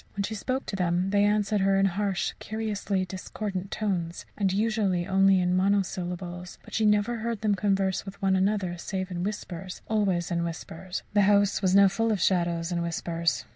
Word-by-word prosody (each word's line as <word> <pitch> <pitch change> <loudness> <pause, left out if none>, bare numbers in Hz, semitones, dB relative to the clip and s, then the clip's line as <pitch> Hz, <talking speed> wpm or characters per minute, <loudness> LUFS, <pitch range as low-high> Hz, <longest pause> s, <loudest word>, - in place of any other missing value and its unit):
When 200 - -1
she 215 - -3
spoke 255 +5 -2
to - - -4
them 180 +1 0
they 205 0 +4
answered 210 0 +2
her 195 0 +3
in 195 - +4
harsh, 195 0 0
curiously 210 -3 -2
discordant 190 +1 -5
tones, 180 -7 -2
and 195 -2 +1
usually 200 -3 +1
only 195 0 +4
in 180 0 +1
monosyllables; 180 -2 -1
but - - -14
she 220 -1 +2
never 210 +3 +2
heard 230 -1 -3
them 215 -1 +2
converse 195 -1 +1
with 195 0 -9
one 195 -1 +2
another 190 -2 0
save 190 0 -4
in 175 -1 -3
whispers 190 -3 -5
always 190 -6 0
in 170 0 0
whispers. 170 +2 -5
The 205 - +5
house 205 -1 +3
was 190 -1 +2
now 200 0 +8
full 225 +4 0
of 210 - 0
shadows 170 -1 +1
and 170 -1 0
whispers. 170 0 -1
195 Hz, 185 wpm, -27 LUFS, 180-205 Hz, -, now